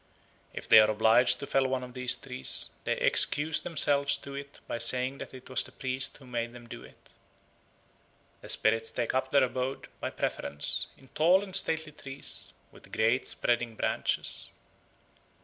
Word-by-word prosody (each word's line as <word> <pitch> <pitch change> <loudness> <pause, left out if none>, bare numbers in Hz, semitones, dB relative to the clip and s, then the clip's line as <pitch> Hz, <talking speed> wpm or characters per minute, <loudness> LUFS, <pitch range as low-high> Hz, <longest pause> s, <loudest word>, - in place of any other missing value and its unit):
If - - -8
they 110 - +8
are 110 0 +5
obliged 110 +3 +4
to - - -4
fell 135 -1 +1
one 130 -1 -2
of 125 -1 -10
these 125 -1 0
trees, 65 - -2
they - - +1
excuse 150 +1 +3
themselves 140 -4 +2
to 140 0 -10
it 140 0 -9
by 115 - -4
saying 125 +3 +1
that - - -8
it 130 -1 -13
was 130 - +1
the - - -9
priest 130 -1 -3
who 135 - -16
made 120 -1 -4
them 120 -1 -12
do - - -10
it. - - -19 1.3
The - - -11
spirits 115 +1 +1
take 120 -2 -3
up 130 0 -1
their 140 -1 +4
abode, 130 +1 -3
by - - -3
preference, 70 - -2
in 135 - -20
tall 175 +7 +3
and 190 -2 -2
stately 160 -1 +4
trees 135 -2 -5 0.2
with - - -17
great 110 +4 +1
spreading 120 -1 -1
branches. - - -2
130 Hz, 170 wpm, -29 LUFS, 120-140 Hz, 1.3 s, they